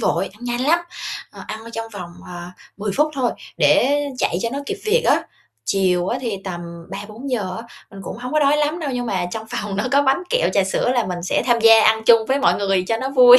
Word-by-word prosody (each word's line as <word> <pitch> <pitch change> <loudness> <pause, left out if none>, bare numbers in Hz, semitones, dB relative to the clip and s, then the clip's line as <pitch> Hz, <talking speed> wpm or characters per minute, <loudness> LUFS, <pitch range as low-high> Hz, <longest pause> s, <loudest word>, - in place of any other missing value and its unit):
vội, 185 +3 +1
ăn 215 +4 -13
nhanh 240 0 -2
lắm, 310 +6 +4 0.5
ờ, - - -11
ăn 215 +1 -6
trong 225 0 -4
vòng, 180 -4 -7 0.2
à, 175 0 -8 0.2
10 205 0 -3
phút 300 +1 +3
thôi, 255 -3 +1 0.3
để 285 +3 +4 0.2
chạy - - +1
cho 230 - 0
nó 275 - -2
kịp - - -2
việc 460 +3 +3
á. - - +4 0.4
Chiều 185 -2 +1
á 245 - -1
thì 230 -5 -2
tầm 175 -3 -4 0.3
3:00-4:00 210 0 -4
á, 225 - -6 0.3
mình 195 - -10
cũng - - -6
hổng 250 +1 -6
có 305 - +3
đói 290 +1 +4
lắm 300 +3 0
đâu, 295 -3 -2
nhưng 245 -1 -2
mà 185 -4 -1
trong 220 +3 -5
phòng 205 -1 -3
nó 200 - 0
có 280 - +5
bánh 270 +5 +2
kẹo, - - +2
trà 195 - +3
sữa 195 +5 0
là 240 -5 +1
mình 180 -1 -4
sẽ 185 - 0
tham 240 -2 +4
gia 225 0 +8
ăn 220 0 +4
chung 230 -2 +6
với 270 +3 +2
mọi - - +3
người 195 -2 +1
cho 225 - +2
nó 260 +3 -3
vui. 250 -2 +9
225 Hz, 245 wpm, -21 LUFS, 195-265 Hz, 0.5 s, vui